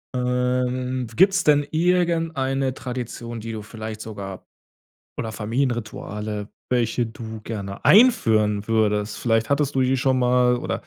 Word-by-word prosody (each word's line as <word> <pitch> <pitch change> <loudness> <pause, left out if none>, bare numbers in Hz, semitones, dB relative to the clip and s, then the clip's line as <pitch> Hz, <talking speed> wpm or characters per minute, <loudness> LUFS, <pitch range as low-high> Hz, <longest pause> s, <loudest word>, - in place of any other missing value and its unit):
Ähm, 125 0 -1
gibt's 190 - +4
denn 145 -1 +4
irgendeine 160 -6 +1
Tradition, 120 -2 -6
die 115 +1 -6
du 110 -2 -6
vielleicht 110 0 -7
sogar 100 -4 -7 0.7
oder 110 - -3
Familienrituale, 105 -3 -3 0.2
welche 120 -1 +1
du 110 0 -8
gerne 100 -3 -6
einführen 110 - +4
würdest? 105 -2 +1
Vielleicht 115 -1 +1
hattest 140 0 +1
du 135 - +3
die 130 +1 +2
schon 130 0 +1
mal 125 0 +3
oder - - -3
125 Hz, 125 wpm, -23 LUFS, 110-130 Hz, 0.7 s, gibt's